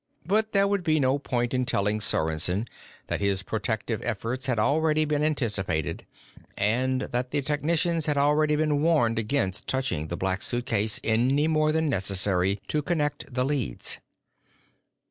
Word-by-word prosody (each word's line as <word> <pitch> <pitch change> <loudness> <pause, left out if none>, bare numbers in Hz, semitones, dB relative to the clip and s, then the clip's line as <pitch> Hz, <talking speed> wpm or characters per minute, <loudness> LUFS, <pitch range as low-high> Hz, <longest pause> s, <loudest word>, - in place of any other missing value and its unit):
But 215 +5 +1
there 200 0 +3
would 200 -2 0
be 155 -2 +2
no 135 +1 +2
point 120 -3 -2
in 130 0 +1
telling 105 -3 +1
Sorensen 90 +5 0 0.4
that - - -3
his 100 -1 0
protective 110 +2 -2
efforts 120 +3 -3
had 125 -3 +1
already 155 +6 +2
been 150 0 0
anticipated 105 - -1 0.5
and 130 +5 +1
that 125 +1 -2
the 140 - -1
technicians 160 +3 +1
had 145 -1 +2
already 150 +2 +3
been 150 -1 +1
warned 145 -9 +2
against 105 -4 -1
touching 130 - -1
the 85 - -4
Black 95 +1 -1
Suitcase 110 -3 0
any 130 +7 +2
more 155 -1 +2
than 160 0 +1
necessary 95 -3 0
to 150 - 0
connect 150 -3 -2
the 125 +1 0
leads. 135 - -2
130 Hz, 150 wpm, -26 LUFS, 105-150 Hz, 0.5 s, there